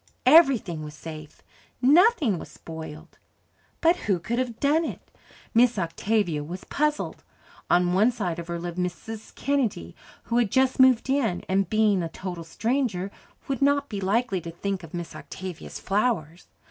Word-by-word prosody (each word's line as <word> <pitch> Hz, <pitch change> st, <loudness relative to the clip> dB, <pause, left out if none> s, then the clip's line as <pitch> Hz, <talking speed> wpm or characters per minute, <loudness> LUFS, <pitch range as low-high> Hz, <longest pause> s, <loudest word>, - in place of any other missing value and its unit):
Everything 255 Hz, -, +5 dB
was 150 Hz, 0 st, -8 dB
safe 155 Hz, -1 st, -10 dB, 0.4 s
nothing 290 Hz, -, +4 dB
was -, -, -9 dB
spoiled. 160 Hz, 0 st, -10 dB, 0.6 s
But 335 Hz, +2 st, +4 dB
who 190 Hz, -, +4 dB
could 235 Hz, +8 st, -2 dB
have 245 Hz, -3 st, -3 dB
done 300 Hz, +4 st, +3 dB
it? -, -, -7 dB, 0.4 s
Miss 240 Hz, 0 st, +4 dB
Octavia 175 Hz, -2 st, 0 dB
was 175 Hz, +5 st, -7 dB
puzzled. 300 Hz, 0 st, -1 dB, 0.5 s
On 175 Hz, 0 st, +3 dB
one 210 Hz, +6 st, +4 dB
side 185 Hz, -8 st, -3 dB
of 170 Hz, -, -7 dB
her 170 Hz, 0 st, -3 dB
lived 175 Hz, +1 st, -5 dB
Mrs. 205 Hz, +5 st, -5 dB
Kennedy, 245 Hz, -, -1 dB, 0.3 s
who 235 Hz, +1 st, +1 dB
had 235 Hz, -4 st, +2 dB
just 260 Hz, +3 st, +2 dB
moved 260 Hz, -2 st, +5 dB
in 260 Hz, -9 st, 0 dB
and, 195 Hz, +1 st, +1 dB
being 215 Hz, -3 st, +3 dB
a 165 Hz, -, -3 dB
total 175 Hz, -1 st, -6 dB
stranger, 205 Hz, +1 st, -1 dB, 0.4 s
would 275 Hz, 0 st, -2 dB
not 285 Hz, 0 st, +2 dB
be 200 Hz, -3 st, -4 dB
likely 195 Hz, -1 st, +1 dB
to 170 Hz, -, -7 dB
think 190 Hz, +3 st, -3 dB
of 165 Hz, 0 st, -10 dB
Miss 175 Hz, -1 st, -6 dB
Octavia's 185 Hz, -2 st, -8 dB
flowers. 195 Hz, -6 st, -1 dB
200 Hz, 160 wpm, -26 LUFS, 175-255 Hz, 0.6 s, Everything